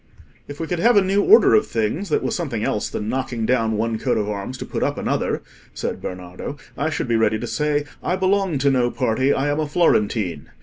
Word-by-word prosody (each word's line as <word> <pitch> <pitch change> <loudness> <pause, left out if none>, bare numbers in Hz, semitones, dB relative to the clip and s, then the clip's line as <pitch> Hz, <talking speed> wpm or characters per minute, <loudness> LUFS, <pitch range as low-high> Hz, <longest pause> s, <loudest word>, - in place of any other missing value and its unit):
"If 145 0 -9
we 165 - -2
could 175 +1 -3
have 235 +3 +4
a 200 - +6
new 195 +2 +2
order 435 - +6
of 425 - +4
things 115 - -2
that - - +1
was - - -1
something 135 -11 -3
else 105 - -1
than 105 - -4
knocking 125 -2 -2
down 115 -2 +1
one 110 0 -1
coat - - 0
of 105 - -1
arms 105 +5 -4
to - - -6
put - - -4
up - - 0
another," - - -1 0.3
said - - -4
Bernardo, 90 +9 -7 0.2
"I 155 - -1
should 155 - -3
be 120 - +1
ready 110 -1 +2
to - - -5
say, 150 -1 0 0.2
'I 180 - 0
belong 190 -3 +1
to 140 +1 +2
no 125 -2 +2
party: 130 +2 +1
I 135 +1 +1
am 145 +1 0
a 155 - -1
Florentine. 105 - +1
130 Hz, 230 wpm, -22 LUFS, 110-165 Hz, 0.3 s, a